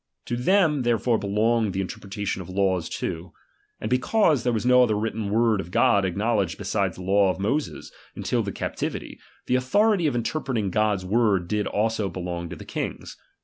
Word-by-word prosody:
To 120 - -2
them 150 +2 +3
therefore 120 -1 +1
belonged 110 +1 +1
the 95 - -2
interpretation 95 +1 -4
of 90 - -10
laws 95 -2 0
too. 85 +2 -5 0.5
And - - -4
because 145 - +2
there 125 - 0
was 115 0 -2
no 125 0 +6
other 115 -4 +3
written 110 -1 -2
word 110 -1 +2
of 85 - -10
God 100 +2 +3
acknowledged 100 -1 0
beside 100 -2 -1
the 90 - -9
law 100 +1 +3
of 95 - -2
Moses, 140 +10 -2 0.2
until - - -1
the - - -3
captivity; - - -4 0.3
the - - -1
authority 200 - +2
of 140 - -1
inter 120 +6 -1
preting 115 -10 -2
Gods 105 -2 +1
word 100 -3 +2
did 105 +1 -1
also 110 -1 0
belong 85 -1 -5
to - - -6
the - - -11
kings. - - -5
105 Hz, 185 wpm, -25 LUFS, 95-120 Hz, 0.5 s, no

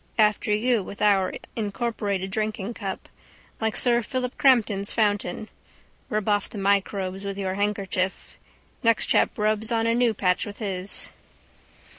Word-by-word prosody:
After 210 -1 +3
you 225 +2 +2
with 200 +1 -9
our 200 -3 +3 0.2
incorporated 205 -3 -2
drinkingcup. 215 -1 -3 0.5
Like 220 -1 -1
sir 240 -1 +3
Philip 250 +2 -3
Crampton's 220 -7 +3
fountain. 205 -2 0 0.6
Rub 215 -1 -1
off 205 -1 +1
the - - -9
microbes 195 -1 0
with 200 0 -4
your 190 -1 -2
handkerchief. 195 -2 -2 0.4
Next 230 -1 +3
chap - - +2
rubs 215 +2 +1
on 225 -1 +1
a 230 - +3
new 235 -2 +2
batch 180 -2 +1
with 205 - -8
his. 195 -3 -2
210 Hz, 135 wpm, -25 LUFS, 195-225 Hz, 0.6 s, After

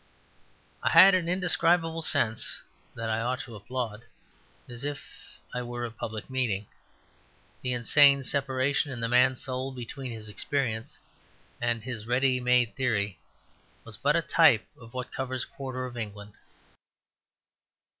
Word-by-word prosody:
I - - +1
had 195 0 +9
an 175 -2 +1
indescribable 170 -2 +2
sense 110 -7 0 0.3
that 115 -1 -4
I 110 0 0
ought 125 +2 -1
to 115 - -9
applaud, 110 +1 -5 0.6
as 120 0 -7
if 145 -1 -8
I 125 - -2
were 120 0 -4
a 115 - -5
public 110 -1 -6
meeting. 120 -7 -1 1.0
The 125 -1 -1
insane 140 +3 +5
separation 135 +1 0
in 125 - -4
the 115 - -1
man's 125 +1 +3
soul 130 0 -3
between 130 +1 -7
his 110 -2 -7
experience 110 0 -2 0.6
and 120 -2 0
his 115 -4 -5
ready 125 +1 +2
made 125 -2 +2
theory 105 - -1 0.6
was - - -9
but - - +1
a - - +2
type - - +5
of 115 +2 -15
what 125 -1 -5
covers 130 -1 -3
a - - -9
quarter 130 -2 -4
of 125 -1 -8
England. 105 -2 -7
125 Hz, 145 wpm, -28 LUFS, 115-135 Hz, 1.0 s, had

